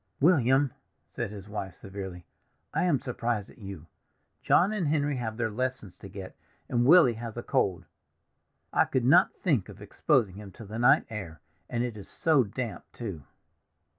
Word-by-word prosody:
"William!" 135 -4 +4 0.3
said - - -4
his 100 -2 -9
wife 100 -3 -5
severely, 95 -3 -8 0.5
"I - - +1
am 155 -7 +3
surprised 115 -5 -3
at - - -19
you. 95 -6 -8 0.6
John 195 +4 +4
and 190 -7 -1
Henry 145 -2 +1
have 110 -3 -4
their 115 -2 -1
lessons 125 -5 -3
to 100 - -11
get, 95 -2 -9 0.3
and 120 0 +1
Willy 165 -6 +7
has 115 0 -7
a - - -4
cold; - - 0 0.9
I - - +4
could 130 -2 0
not 175 +8 +5
think 140 - +1
of - - -11
exposing 105 -7 +1
him 105 -1 -9
to 115 - -11
the 110 +3 -6
night 120 +2 +5
air; 90 -8 -6 0.3
and 120 -1 -1
it 120 -3 -3
is 100 - -10
so 155 -5 +3
damp, 115 +2 -5
too!" 95 - -7
115 Hz, 170 wpm, -28 LUFS, 100-135 Hz, 0.9 s, Willy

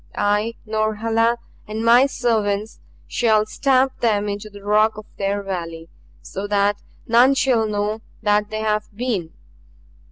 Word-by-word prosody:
I, 210 +3 0
Norhala, 225 +2 +1 0.3
and 220 +2 -4
my 240 +4 +6
servants 220 -5 -1 0.3
shall 220 -4 +2
stamp 265 +3 +1
them 210 -3 +1
into 205 +1 -5
the 205 -1 -13
rock 215 +1 +2
of 215 - -8
their 200 0 -1
valley 165 -4 -5 0.3
so 195 +2 -5
that 205 0 +1 0.2
none 245 +3 +5
shall 240 -5 +2
know 210 +1 -2 0.2
that 210 0 +2
they 215 0 -4
have 215 -1 0
been! 210 -8 -2
215 Hz, 135 wpm, -21 LUFS, 205-230 Hz, 0.3 s, my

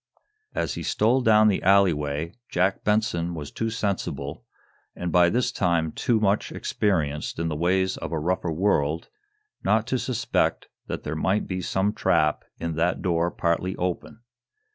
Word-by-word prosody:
As - - -1
he - - -5
stole 120 +5 +2
down 110 -2 +5
the 100 - +2
alley 100 -1 +5
way 75 +3 -3 0.2
Jack 95 +2 +1
Benson 90 -5 0
was 75 -3 -6
too 115 - -2
sensible, 95 -10 -3 0.5
and 90 -1 -3
by 85 +1 +5
this 125 +6 +1
time, 85 -4 +1
too 115 +6 +1
much 105 0 +1
experienced 75 -8 -1
in 85 0 -1
the 75 - -2
ways 95 +4 +1
of - - -6
a 80 - -1
rougher 90 +2 -1
world, 80 -3 0 0.5
not 110 +1 +2
to 130 - -1
suspect 125 -2 -1 0.2
that - - -4
there 75 - -3
might 95 +6 +1
be 90 -1 -3
some 95 +3 0
trap 75 -7 +1 0.2
in 85 -1 -2
that 85 +2 0
door 85 -2 +1
partly 90 +2 -1
open. 90 +5 -4
90 Hz, 165 wpm, -25 LUFS, 80-105 Hz, 0.5 s, down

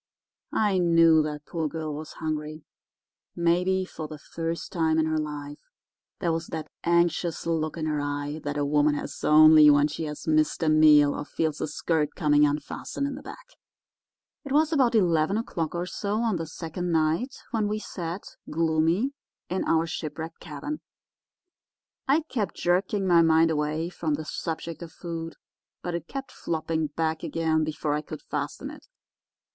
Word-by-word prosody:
I 205 -3 +2
knew 165 -2 +5
that 150 -1 -4
poor 165 -2 -2
girl 155 0 -4
was 150 +1 -7
hungry—maybe 170 +4 -3
for 155 -4 -7
the 155 - -8
first 165 +3 -5
time 160 -2 +1
in 160 - +3
her 155 0 0
life. 145 -1 -5 0.6
There 170 - 0
was 165 +1 -2
that 155 -2 -6
anxious 170 0 +1
look 160 -1 -1
in 160 - -2
her 150 -2 0
eye 145 +1 -3
that 145 0 -3
a 145 - +1
woman 145 +1 +3
has - - -6
only 155 0 +8
when 145 0 +5
she 155 +2 -4
has 150 -1 -6
missed 155 0 +2
a 160 - +3
meal 150 -2 +6
or - - -4
feels 155 +1 -2
her - - -1
skirt 150 0 -1
coming 150 -2 +4
unfastened 145 - -3
in 280 - -2
the 275 - -8
back. - - -10 1.0
"It 280 - -8
was 310 +3 +3
about 255 -6 +3
eleven 175 -2 +3
o'clock 170 -8 -3
or 175 +1 -1
so 205 +3 -2
on 225 -6 +1
the 165 -1 -4
second 170 +2 -4
night 165 - +1 0.2
when 220 -2 +1
we 210 +1 -1
sat, 180 -3 -5 0.3
gloomy, 165 - +1 0.4
in 185 - -1
our 165 0 +2
shipwrecked 160 0 -5
cabin. 165 - -6 1.3
I 285 +4 +4
kept 235 - -3
jerking 190 +3 +1
my 175 -2 +6
mind 160 0 +4
away 155 +2 -1
from 160 -4 -2
the 155 +1 -6
subject 165 +1 -5
of 170 -1 -8
food, 165 -1 -6 0.5
but 175 - -3
it 170 -1 -4
kept 270 0 -6
flopping 160 -1 -2
back 160 +1 -2
again 160 -1 0
before 155 -1 -2
I 150 - 0
could 155 0 -9
fasten 150 - -4
it. 300 - -14
160 Hz, 170 wpm, -26 LUFS, 155-175 Hz, 1.3 s, only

